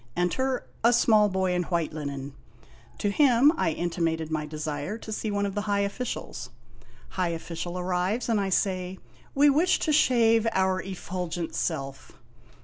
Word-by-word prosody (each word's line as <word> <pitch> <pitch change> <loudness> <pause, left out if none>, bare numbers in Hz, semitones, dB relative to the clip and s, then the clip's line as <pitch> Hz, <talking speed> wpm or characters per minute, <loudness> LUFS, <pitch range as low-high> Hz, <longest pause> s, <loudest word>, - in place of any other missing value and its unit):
Enter 255 +10 0 0.2
a 235 +1 +5
small 215 -3 +4
boy 190 -1 0
in 180 - +1
white 170 -3 -1
linen. 140 -2 -5 0.6
To 205 - 0
him 275 +3 +5
I - - +1
intimated 165 -1 -2
my 155 -1 -2
desire 150 +5 -4
to 220 - -9
see 215 0 -3
one 205 0 0
of 200 - -3
the 205 - -1
high 200 0 +2
officials. 200 +5 -4 0.6
High 185 -2 -1
official 170 +1 -5
arrives, 180 +5 -1
and 225 -3 +2
I 195 - -1
say: 185 -1 0 0.4
"We 285 +1 +6
wish 340 +6 +3
to 310 - +1
shave 230 -5 +4
our 190 0 +1
effulgent 180 -3 -5
self." 135 -5 -3
185 Hz, 155 wpm, -27 LUFS, 165-225 Hz, 0.6 s, We